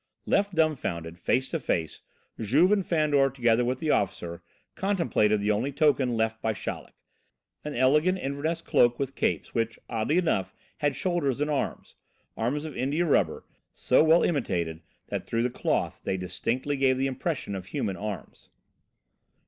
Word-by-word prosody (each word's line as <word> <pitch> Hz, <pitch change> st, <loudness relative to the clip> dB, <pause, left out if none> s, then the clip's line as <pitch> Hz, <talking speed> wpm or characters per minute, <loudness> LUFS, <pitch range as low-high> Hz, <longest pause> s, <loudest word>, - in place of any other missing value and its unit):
Left 200 Hz, -2 st, +1 dB
dumbfounded, 90 Hz, -, -1 dB
face 130 Hz, +8 st, +1 dB
to 165 Hz, -, -2 dB
face, 80 Hz, -, -2 dB, 0.4 s
Juve 140 Hz, -, +3 dB
and 205 Hz, -2 st, +3 dB
Fandor, 150 Hz, -5 st, +2 dB
together 120 Hz, -2 st, +2 dB
with 125 Hz, +1 st, 0 dB
the 155 Hz, +2 st, 0 dB
officer, 85 Hz, -3 st, -1 dB, 0.3 s
contemplated 170 Hz, -, +1 dB
the 105 Hz, +1 st, +2 dB
only 115 Hz, +7 st, 0 dB
token 135 Hz, -5 st, +2 dB
left 110 Hz, 0 st, 0 dB
them 110 Hz, -, 0 dB
by -, -, +1 dB
Chaleck. -, -, -6 dB, 0.7 s
An 150 Hz, -1 st, -5 dB
elegant 150 Hz, +9 st, +3 dB
Inverness 155 Hz, +2 st, -2 dB
cloak 120 Hz, 0 st, +3 dB
with 135 Hz, -1 st, -3 dB
capes, -, -, -1 dB
which, 115 Hz, 0 st, -1 dB
oddly 115 Hz, +7 st, 0 dB
enough, 160 Hz, -, 0 dB, 0.2 s
had 145 Hz, -1 st, 0 dB
shoulders 165 Hz, -8 st, 0 dB
and 150 Hz, +1 st, 0 dB
arms 145 Hz, -, -3 dB, 0.4 s
arms 140 Hz, +7 st, -1 dB
of 155 Hz, -, -7 dB
India 145 Hz, +7 st, 0 dB
rubber, 95 Hz, -, +1 dB, 0.3 s
so -, -, +3 dB
well 160 Hz, +2 st, +5 dB
imitated 85 Hz, -, -1 dB, 0.3 s
that -, -, -4 dB
through 115 Hz, 0 st, 0 dB
the 125 Hz, -, 0 dB
cloth -, -, -1 dB
they 95 Hz, -, -1 dB
distinctly 125 Hz, +9 st, -2 dB
gave 130 Hz, -1 st, +3 dB
the 135 Hz, -, 0 dB
impression 135 Hz, -3 st, -3 dB
of 95 Hz, -1 st, -6 dB
human 100 Hz, 0 st, -2 dB
arms. 105 Hz, -1 st, -7 dB
130 Hz, 160 wpm, -27 LUFS, 110-155 Hz, 0.7 s, well